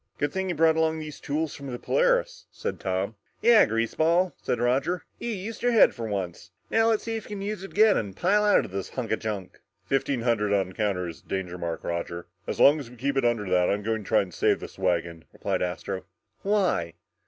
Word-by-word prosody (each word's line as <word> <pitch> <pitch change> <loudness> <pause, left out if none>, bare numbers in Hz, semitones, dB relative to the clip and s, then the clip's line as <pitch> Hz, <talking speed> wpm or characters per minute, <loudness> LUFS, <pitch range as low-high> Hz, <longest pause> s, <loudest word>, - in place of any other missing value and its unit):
"Good 145 -1 -1
thing 190 0 -1
you 175 - -1
brought 160 +1 +4
along 160 0 +1
those 155 -1 -7
tools 150 +1 -2
from 140 - -8
the 125 -2 -4
Polaris," - - +1
said - - -4
Tom. 95 +2 -1 0.3
"Yeah, 230 -1 +7
greaseball," 160 +11 +1
said 120 - -1
Roger, 135 +9 +1 0.2
"you 235 - -3
used 220 +1 -5
your 245 0 +2
head 225 - +6
for 115 -2 -5
once. 95 -2 -4 0.2
Now 225 0 +4
let's 225 -2 +2
see 225 -1 -3
you 205 - -5
use 205 0 -4
it 195 - -7
again 215 0 +5
and 100 -3 -3
pile 205 +4 +3
out 210 - +4
of - - -10
this 95 0 -4
hunk 125 -4 -4
of 110 - +1
junk!" 105 -4 -5 0.3
"Fifteen 135 -2 0
hundred 110 -4 +1
on 95 -2 +1
the - - -12
counter 95 -3 -1
is 85 - -9
the - - -29
danger 90 -2 -3
mark, 85 -1 -4
Roger, 85 0 -3
and - - -24 0.2
as - - -3
long 145 +3 +7
as 135 -5 -8
we 125 - -13
keep 135 +4 -1
it 135 - +2
under 115 -4 +1
that, 90 -1 +3
I'm 105 +1 0
going 110 0 -1
to - - -14
try 110 - +4
and 90 -3 -11
save - - +2
this - - -10
wagon!" 85 -2 -1
replied - - -2
Astro. 90 +2 -3 0.4
"Why? 190 - +1
125 Hz, 235 wpm, -26 LUFS, -, 0.4 s, Yeah